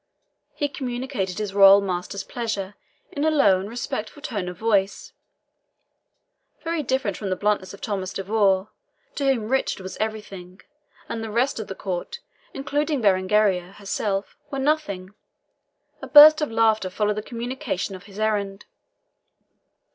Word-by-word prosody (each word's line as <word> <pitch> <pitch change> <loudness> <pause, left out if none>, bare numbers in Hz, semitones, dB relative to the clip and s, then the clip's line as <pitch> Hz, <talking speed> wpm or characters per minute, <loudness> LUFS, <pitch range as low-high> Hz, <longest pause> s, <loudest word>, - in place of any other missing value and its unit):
He 290 - 0
communicated 250 -8 -4
his 210 -2 -3
royal 195 0 +8
master's 190 0 -3
pleasure 210 -5 -4 0.4
in 285 - -3
a 315 - +4
low 280 -12 +4
and 195 +2 -6
respectful 235 +2 -5
tone 200 -7 -3
of 180 - -9
voice, 200 -3 0 1.5
very 330 -1 -1
different 260 -8 -1
from 200 - -4
the 185 - 0
bluntness 205 -1 0
of 200 - -12
Thomas 195 -3 -3
de 195 - -4
Vaux, 200 -1 +1 0.4
to 280 - -2
whom 250 -6 +1
Richard 265 -5 0
was 185 - -7
everything 200 -4 -5 0.5
and 225 - -4
the 220 - -5
rest 240 +4 0
of 215 - -5
the 195 - -6
Court, 190 - -5 0.3
including 290 +2 -1
Berengaria 190 -2 +2
herself, 200 0 -3
was 275 -1 -3
nothing. 200 -12 -1 0.9
A 270 - -7
burst 300 +3 +9
of 300 - 0
laughter 220 -3 +2
followed 210 +2 -1
the - - -1
communication 240 -3 -4
of 185 - -12
his 200 -1 -14
errand. 205 -2 -1
210 Hz, 145 wpm, -24 LUFS, 195-255 Hz, 1.5 s, burst